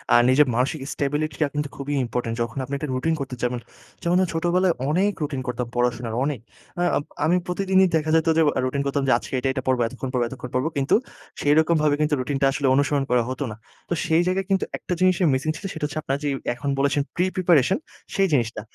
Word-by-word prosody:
আ - - +9
নিজের 140 +3 +5
মানসিক 135 +4 0
স্টেবিলিটি 145 +1 -2
টা 150 - +4
কিন্তু 150 -1 -1
খুবই 140 +1 -4
ইম্পোর্টেন্ট। 115 -1 -3
যখন 115 +1 -3
আপনি 135 +2 -7
একটা 150 +1 -5
রুটিন 160 +6 0
করতে 135 -2 -4
যাবেন, 125 0 0 0.4
যেমন 175 +1 +2
আ - - +2
ছোটবেলায় 175 +2 +2 0.2
অনেক 190 +6 +2
রুটিন 140 -3 -3
করতাম 125 -1 -2
পড়াশোনার, 120 -2 0
অনেক। 145 -3 -1 0.4
আ - - 0 0.2
আম - - -2 0.2
আমি 170 +3 +3
প্রতিদিনই 190 +1 +3
দেখা 155 -1 0
যেত 160 0 +2
যে - - +5 0.2
আ - - +2
রুটিন 140 +2 -1
করতাম 140 0 0
যে 130 - +4
"আজকে - - -9
এইটা, 125 - -1
এইটা 130 -1 -3
পড়বো, 130 -2 +2
এতক্ষণ 130 +2 -6
পড়বো 125 -2 +1
এতক্ষণ 125 -1 -8
পড়বো," 130 +5 +1
কিন্তু 135 0 +3 0.5
সেরকমভাবে 155 0 +3
কিন্তু 150 0 +1
রুটিনটা 135 +2 0
আসলে 140 -1 0
অনুসরণ 140 0 +2
করা 125 -1 +3
হতো 130 +2 -3
না। 105 - -7 0.3
তো - - +1
সেই 160 +1 +3
জায়গায় 190 +1 0
কিন্তু 195 - +2
একটা 180 - -4
জিনিসের 185 -1 +3
মিসিং 135 +4 -1
ছিল 195 - -9
সেটা 160 - -7
হচ্ছে 150 +1 -3
আপনারা 135 -1 -2
যেই 145 - 0 0.2
এখন 140 +4 -4
বলেছেন 140 +1 +2
প্রি-প্রিপারেশন, 180 -3 +3 0.4
সেই 195 0 +3
জিনিসটা। 115 -5 0
145 Hz, 215 wpm, -23 LUFS, 130-165 Hz, 0.5 s, আ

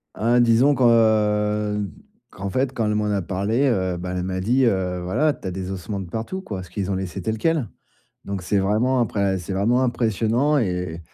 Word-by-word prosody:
Ah, 120 +2 +2
disons 120 +4 +4
que, 130 - 0
heu, 105 -2 +2 0.4
qu'en 100 +1 -5
fait, 130 +4 0
quand 115 -3 -1
elle 105 0 0
m'en 105 0 0
a 100 -2 0
parlé, 105 +10 0
heu, 95 -6 0
bah, 90 +1 -5
elle 90 - -2
m'a 95 0 -3
dit, 125 +7 +2
heu: 90 -4 0
«Voilà, 145 +12 +1
tu 95 - -9
as - - -2
des 95 +1 -5
ossements 95 +2 -5
de 90 -3 -7
partout», 115 - -4
quoi, 100 - -6
parce 90 -2 -9
qu'ils 100 -1 -3
ont - - 0
laissé 95 0 -4
tel 110 +5 -2
quel. 160 -3 0 0.6
Donc 100 -2 -4
c'est 100 +3 0
vraiment 115 +7 +2
imprè 100 -4 0
c'est 90 +2 -6
vraiment 120 +6 +2
impressionnant 120 +4 +1
et 115 - +1
et 90 -2 -4
105 Hz, 215 wpm, -22 LUFS, 95-120 Hz, 0.6 s, disons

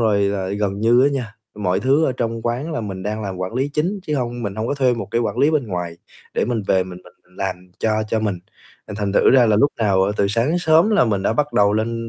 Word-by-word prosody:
rồi 105 -3 +2
là 100 -1 -1
gần 100 0 -2
như 120 +3 +4
á 140 - +5
nha, 120 -6 -4 0.2
mọi 95 -3 -1
thứ 140 +5 +3
ở 130 - +1
trong 115 -1 -2
quán 125 +8 -2
là 155 - -2
mình 95 -4 -6
đang 105 +2 -3
làm 95 -2 -4
quản 95 +4 -4
lý 135 +3 0
chính, 170 +8 -2
chứ 150 -4 -2
hông 120 -2 -3
mình 100 -3 -3
hông 110 +2 -3
có - - 0
thuê 130 -3 +2
một 115 - -6
cái 120 - +1
quản 115 - -2
lý 145 - +4
bên 150 -6 0
ngoài, 90 -4 -4 0.4
để - - +1
mình 120 -3 -2
về 95 -1 +3
mình 90 -1 -9
mình 90 0 -22
làm 95 -2 -2 0.2
cho 110 - 0 0.2
cho 110 - 0
mình. 105 -4 -1 0.5
Là - - -7
thành 100 -2 -1
thử - - +4
ra 130 -3 +6
là 105 -2 +3
lúc 140 +7 +3
nào, 100 -4 +2
ờ, 100 +2 +1
từ 100 - +2
sáng 115 +5 +1
đến 170 +3 +1
sớm 165 +4 +4
là 210 - +4
mình 100 -4 0
đã 100 - +1
bắt 145 +5 -1
đầu 100 0 +3
lên 115 +2 -2
110 Hz, 285 wpm, -20 LUFS, 100-130 Hz, 0.5 s, ra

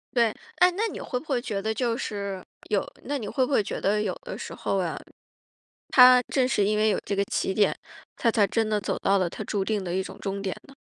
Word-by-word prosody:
对， 235 -1 +5 0.3
诶， 360 - +7
那 450 +2 +1
你 - - -7
会 250 - -3
不 305 - -16
会 265 -5 0
觉 215 -5 -3
得 220 +1 -1
就 235 -1 -1
是， 200 -6 -4 0.3
有 - - +1 0.2
那 290 0 -2
你 220 - -5
会 260 +4 +1
不 255 - -6
会 240 - +3
觉 - - -5
得 210 +2 +2
有 - - -1
的 - - -6
时 - - -7
候 - - -2
啊， - - -1 0.9
他 250 -1 +8
正 260 -2 +1
是 210 -5 +2
因 210 +1 +1
为 215 +1 +3
有 - - +1
这 200 - -1
个 200 - +2
起 190 - -1
点， 205 +1 +3 0.4
他 230 - +2
才 220 -2 +3
真 220 +3 0
地 210 -1 +1
走 - - -2
到 200 0 +3
了 180 -3 +1
他 - - -8
注 200 -2 -1
定 210 0 -1
的 175 -1 -4
一 190 - 0
种 - - -10
终 200 0 -3
点 190 -2 -2
呢？ 275 - -15
215 Hz, 275 characters per minute, -26 LUFS, 200-250 Hz, 0.9 s, 他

